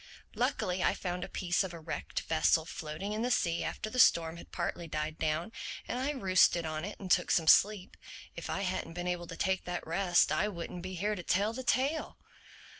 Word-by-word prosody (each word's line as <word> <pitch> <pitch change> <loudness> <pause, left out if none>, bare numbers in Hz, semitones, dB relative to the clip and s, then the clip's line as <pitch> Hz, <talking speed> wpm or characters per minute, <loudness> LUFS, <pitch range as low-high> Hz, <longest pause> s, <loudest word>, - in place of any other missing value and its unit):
Luckily 180 0 0
I - - +2
found 180 -1 -3
a - - -6
piece 180 0 0
of 180 -3 -6
a - - -8
wrecked 155 - -4
vessel 155 - +2
floating 160 +6 -5
in 215 - -2
the 245 - 0
sea 170 -8 +1
after - - -4
the 255 +4 -3
storm 165 -7 +5
had - - -12
partly 170 -1 -3
died 155 0 -3
down; 160 +5 -1 0.4
and 245 - -2
I 265 +2 0
roosted 185 - +3
on 155 0 -3
it 205 +3 -6
and 190 -2 -6
took 180 - +3
some 165 -2 +2
sleep. 200 +2 +4 0.4
If - - -6
I - - -1
hadn't 180 -3 -2
been 175 +1 -4
able 175 -1 -2
to 165 - -8
take 190 -1 0
that 175 0 -4
rest 175 +2 +3
I 170 +7 +2
wouldn't 175 -2 -6
be 185 +1 -6
here 205 +4 0
to 195 - -4
tell 200 +5 +1
the 260 - -5
tale." 275 +5 0
180 Hz, 215 wpm, -31 LUFS, 165-200 Hz, 0.4 s, storm